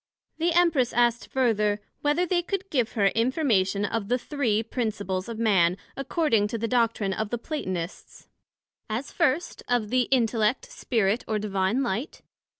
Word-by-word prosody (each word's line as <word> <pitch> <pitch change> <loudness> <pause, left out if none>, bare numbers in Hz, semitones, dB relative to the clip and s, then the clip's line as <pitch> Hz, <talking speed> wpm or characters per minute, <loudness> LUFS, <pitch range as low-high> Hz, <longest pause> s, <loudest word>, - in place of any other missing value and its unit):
The 340 +2 +2
Empress 330 -8 +3
asked 240 -1 +2
further, 215 -5 +1 0.2
Whether 295 +5 +2
they 355 0 +1
could 390 +2 -4
give 245 -6 0
her 200 -4 +3
information 225 - +1
of 205 -1 -2
the 245 +3 +2
three 240 -5 -1
principles 210 -5 -3
of 230 - -5
Man, 190 -6 +3 0.2
according 270 - +1
to 230 +2 -3
the 230 +1 -2
doctrine 230 -5 +1
of 215 +1 -3
the 240 - -2
Platonists; 185 - -5 0.6
as 230 +6 -3
first 335 0 0
of 240 -4 0
the 255 -1 +2
Intellect, 230 - +2
Spirit, 225 - 0
or 215 - 0
Divine 205 +4 0
Light. 240 - -3
230 Hz, 150 wpm, -26 LUFS, 210-270 Hz, 0.6 s, Empress